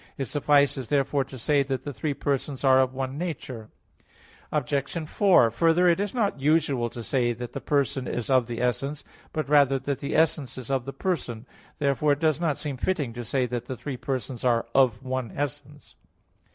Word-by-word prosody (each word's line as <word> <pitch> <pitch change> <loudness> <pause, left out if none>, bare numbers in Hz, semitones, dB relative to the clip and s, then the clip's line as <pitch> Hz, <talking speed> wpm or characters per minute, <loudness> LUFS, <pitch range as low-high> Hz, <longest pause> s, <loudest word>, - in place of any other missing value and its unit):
It 135 - -2
suffices 140 -2 +2
therefore 140 +1 +1
to 135 0 -10
say 145 +4 +2
that 135 -1 -2
the 145 - -5
three 140 +5 -2
persons 140 0 -2
are 130 -1 +6
of 130 0 -1
one 135 +2 -3
nature. 130 -10 -5 0.8
Obj. 145 +2 -1
4: 175 - +4
Further, 165 +5 +3
it 170 +1 +4
is 205 0 -1
not 205 - 0
usual 140 -4 +2
to 120 0 -8
say 120 0 +1
that 120 +1 -7
the - - -5
person 140 -3 0
is 120 - -3
of 130 -3 +3
the 120 -1 -4
essence; 140 +4 -1 0.3
but 155 -3 -2
rather 140 -2 +5
that 135 0 -3
the 140 - -3
essence 150 -5 +1
is 130 0 -6
of 130 -3 0
the 135 - -4
person. 125 - -3 0.3
Therefore 145 +1 +2
it 140 - -4
does 155 -1 +2
not 155 -5 +1
seem 145 -3 -4
fitting 145 -6 -1
to 120 +1 -6
say 125 +3 0
that 120 -1 -4
the 130 - -5
three 140 +2 -5
persons 130 -2 -4
are 120 -2 +2
of 130 -3 +3
one 130 -2 -3
essence. 145 +1 -5
135 Hz, 195 wpm, -26 LUFS, 125-150 Hz, 0.8 s, are